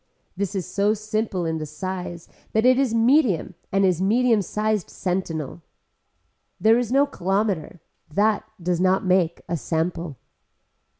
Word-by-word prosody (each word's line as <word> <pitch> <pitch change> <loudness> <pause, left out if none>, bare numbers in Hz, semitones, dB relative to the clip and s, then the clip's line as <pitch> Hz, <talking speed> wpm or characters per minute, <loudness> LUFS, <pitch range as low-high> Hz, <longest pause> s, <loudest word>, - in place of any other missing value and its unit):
This 200 0 -3
is 185 -4 -2
so 205 +1 +1
simple 215 -4 -2
in 160 -1 -1
the 155 - -4
size 175 +2 -6 0.3
that 220 +2 +2
is 255 -1 +4
medium 230 - +3 0.2
and 195 0 +3
is 180 -2 +1
medium 225 +2 +3
sized 210 0 -1
sentinel. 175 -4 -3 1.0
There 225 +2 +5
is 245 -2 -2
no 275 +2 +4
kilometer. 190 - -1 0.3
That 210 +6 +2 0.2
does 175 0 -1
not 190 +1 +2
make 180 -2 +2
a 170 - -1
sample. 165 -2 -2
190 Hz, 135 wpm, -23 LUFS, 175-220 Hz, 1.0 s, There